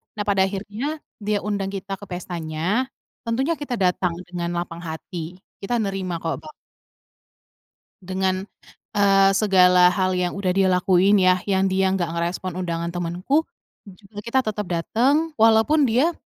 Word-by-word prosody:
Nah, 210 - -2
pada 200 -2 +2
akhirnya 210 +10 -4 0.2
dia 210 0 0
undang 200 -1 -2
kita 195 0 -5
ke 205 - -10
pestanya, 175 +5 -2 0.4
tentunya 265 +8 +1
kita 280 -4 -3
datang 180 -2 +1
dengan 175 -1 -4
lapang 170 -1 -6
hati, 170 +1 -7 0.2
kita 220 +5 -1
nerima 195 -3 -3
kok, 165 - -2
ba - - -11 1.5
Dengan, 185 0 -1 0.5
eee, 195 -1 +5
segala 180 -3 +5
hal 185 0 +1
yang 180 -1 -1
udah 190 -2 0
dia 190 +1 +3
lakuin 185 +2 +4
ya, 185 0 +4
yang 195 -1 +2
dia 190 0 +2
enggak 185 -3 -1
ngerespon 175 +2 -3
undangan 170 -1 -3
temenku, 175 - -1 0.4
dan 195 - -11
juga 200 +2 -19
kita 230 +5 0
tetep 210 -2 -3
dateng, 255 - +1
walaupun 225 +7 +5
dia 255 +9 +3
190 Hz, 150 wpm, -23 LUFS, 180-210 Hz, 1.5 s, eee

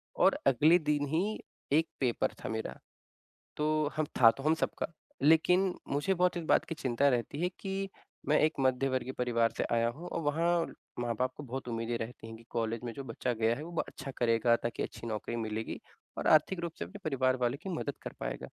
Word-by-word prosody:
और - - +4
अगले 155 +7 +6
दिन 150 -2 +1
ही, 185 +9 0 0.3
एक 160 +3 +4
पेपर 125 -4 +1
था - - -3
मेरा। 110 0 -3 0.8
तो 155 0 +1
हम 155 -1 +1
था 115 -2 +10
तो 135 - -8
हम 155 +2 +4
सबका, - - -2 0.4
लेकिन 180 +5 +4
मुझे 145 +7 +1
बहुत 180 0 +2
इस 170 - -3
बात - - +4
की 165 - -4
चिंता 135 -1 +2
रहती 125 +4 -1
है 180 - +2
कि, 195 0 -2 0.4
मैं 150 - +5
एक 155 +1 +4
मध्यवर्गीय 130 -1 +1
परिवार 115 -2 +2
से - - 0
आया 115 0 +3
हूँ 165 +9 -6
और 170 - -2
वहाँ 160 +4 +1 0.5
माँ-बाप 120 +2 0
को 150 - -7
बहुत 130 -1 -5
उम्मीदें 115 0 -2
रहती 115 0 -6
हैं 115 0 -8
कि 115 - -15
कॉलेज 115 -1 -1
में 120 - -3
जो 135 +3 -7
बच्चा 120 +1 -2
गया 115 0 +2
है, 150 - -6
वो 170 - -7
ब 165 - +1
अच्छा 135 0 -7
करेगा 115 0 +3
ताकि 120 - -3
अच्छी 115 - -6
नौकरी 110 +1 -3
मिलेगी 110 -1 -3 0.4
और - - -3
आर्थिक 160 +4 +4
रूप 170 -1 -3
से - - -2
अपने 85 - -10
परिवार 130 -3 +2
वालों 125 +1 0
की 195 - -6
मदद 145 -3 -3
कर - - -6
पाएगा। - - -4
135 Hz, 210 wpm, -31 LUFS, 115-155 Hz, 0.8 s, था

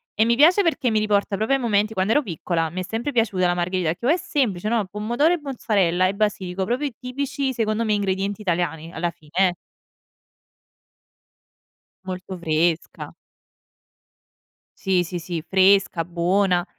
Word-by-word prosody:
E 220 - +3
mi 235 +1 +3
piace 340 - +6
perché 310 -8 +1
mi 215 - +2
riporta 205 -1 +1
proprio 220 +6 +1
ai 270 - -2
momenti 215 -2 +1
quando 190 +3 +1
ero 295 - +3
piccola, 165 -3 -2
mi 185 +2 -4
è - - -3
sempre 225 +9 -3
piaciuta 210 -7 +1
la 175 - +1
margherita 180 -1 -1
e - - +1
che - - -20
però 245 - +1
è 345 - +3
semplice, 220 - -1
no. 230 -4 +1
Pomodoro 240 - +1
e 350 - -1
mozzarella 200 -10 +1
e 190 - -1
basilico, 195 -3 -1
proprio 245 +8 -1
i 270 - -8
tipici 265 +2 -3
secondo 225 -1 -1
me 215 - +1
ingredienti 200 0 -1
italiani 170 -4 -2
alla 170 +1 -1
fine, 155 -3 -22 0.2
eh. - - -4 2.5
Molto 185 0 -6
fresca. 165 0 -1 1.7
Sì, 185 -2 +1
sì, 175 +1 -5
sì 165 -1 -5
fresca, 190 -2 +3
buona. 175 +1 +1
200 Hz, 165 wpm, -23 LUFS, 175-230 Hz, 2.5 s, piace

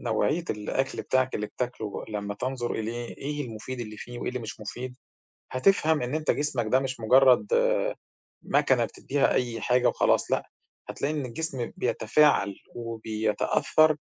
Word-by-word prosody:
نوعية 140 +8 0
الأكل 130 +6 -2
بتاعك 130 0 +1
اللي 105 - -2
بتاكله 120 -4 -4
لمّا 105 -1 -3
تنظر 125 +1 -3
إليه 115 +2 -4
إيه 145 +1 -3
المفيد 120 +3 -6
اللي 110 -2 -6
فيه 120 +2 -8
وإيه - - -3
اللي 125 - -2
مش 110 -1 -7
مفيد، 125 +5 -6 0.6
هتفهم 160 +2 +3
إن 125 +4 -2
أنت 155 -1 +1
جسمك 135 -6 -1
ده 130 - +5
مش 130 -2 -4
مُجرّد 135 - +5 0.7
ماكنة - - +2
بتدّيها 145 - 0
أي 120 -3 -1
حاجة 125 0 +3
وخلاص - - +2
لأ، - - 0 0.4
هتلاقي 145 +2 -2
إن 145 -3 -2
الجسم 130 0 -3
بيتفاعل 120 -4 +3 0.2
وبيتأثّر 115 +6 +1
125 Hz, 145 wpm, -27 LUFS, 110-140 Hz, 0.7 s, ده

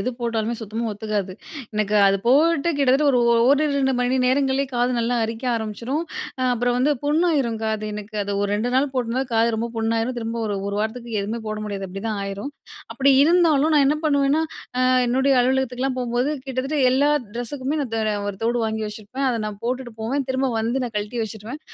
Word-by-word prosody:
எது 250 +6 -1
போட்டாலுமே, 230 -1 -1
சுத்தமா 225 +2 -4
ஒத்துக்காது. 205 -3 -3 0.4
எனக்கு 215 0 +1
அது 195 - +3
போட்டு 310 +5 +4
கிட்டத்தட்ட 270 -2 +3 0.3
ஒரிரு 300 +2 +2
2 265 -1 +2
மணி 250 +1 +1
நேரங்கள்லே 270 +1 +2
காது 245 +1 +2
நல்லா 235 +1 0
அரிக்க 225 +3 -5
ஆரம்பிச்சிரும். 230 +8 -3 0.4
அ - - 0
அப்புறம் 245 +1 0
வந்து 290 +4 +3
புண்ணாயிரும் 295 -7 +1
காது 220 -1 -1
எனக்கு. 210 +1 -8
அது 205 - -3
ஒரு 205 - 0
2 220 +4 -1
நாள் 275 +1 +2
போட்டுந்தா, 250 +1 0
காது 225 +1 +4
ரொம்ப 230 +2 -2
புண்ணாயிரும். 225 +2 0
திரும்ப 230 0 -4
ஒரு 205 - -2
1 200 - -3
வாரத்துக்கு 225 0 -3
எதுவுமே 225 +3 -4
போட 215 - -3
முடியாது, 195 -1 -4
அப்பிடிதான் 200 +2 -4
ஆயிரும். 200 +8 -5 0.4
அப்பிடி 275 0 +3
இருந்தாலும், 320 -2 +4
நான் 290 -2 +5
என்ன 300 - +1
பண்ணுவேன்னா 285 +1 +2 0.4
அ - - +4 0.2
என்னுடைய 265 +3 +2
அலுவலகத்துக்குலாம் 260 0 0
போம்போது, 245 +3 0 0.2
கிட்டத்தட்ட 270 +3 -2
எல்லா 285 +3 +3 0.2
ட்ரெஸ்ஸுக்குமே 260 +4 -3
நான் 245 -5 -6
தர 220 -1 0 0.2
ஒரு 200 - -4
தோடு 240 +1 +1
வாங்கி 220 0 -2
வச்சிருப்பேன். 215 +6 -4
அத 235 - -1
நான் 205 -1 -7
போட்டுட்டு 250 -1 -3
போவேன், 265 +4 -1
திரும்ப 260 +1 +1
வந்து 235 +4 0
நான் 240 -3 -4
கழட்டி 210 +3 -3
வச்சுருவேன். 220 +7 -8
245 Hz, 180 wpm, -22 LUFS, 220-270 Hz, 0.4 s, நான்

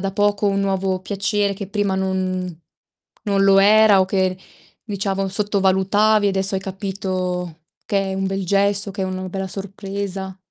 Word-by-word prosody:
da 195 0 -2
poco 205 +1 +1
un 200 0 0
nuovo 190 -1 0
piacere 200 +1 -1
che 195 0 -6
prima 205 -1 0
non 185 -2 -2 0.6
non 200 -1 +1
lo 195 0 +6
era 210 0 +6
o - - +4
che, 185 -1 0 0.5
diciamo, 195 -2 -2
sottovalutavi 205 +1 +2
e - - +4
adesso 190 +1 0
hai - - -2
capito 185 -3 -4 0.3
che 195 -1 0
è - - -3
un 195 0 -1
bel 195 0 -2
gesto, 200 +1 +1
che 200 - -6
è - - 0
uno 185 0 -4
bella 190 0 -4
sorpresa? 195 -1 -5
195 Hz, 165 wpm, -21 LUFS, 190-200 Hz, 0.6 s, lo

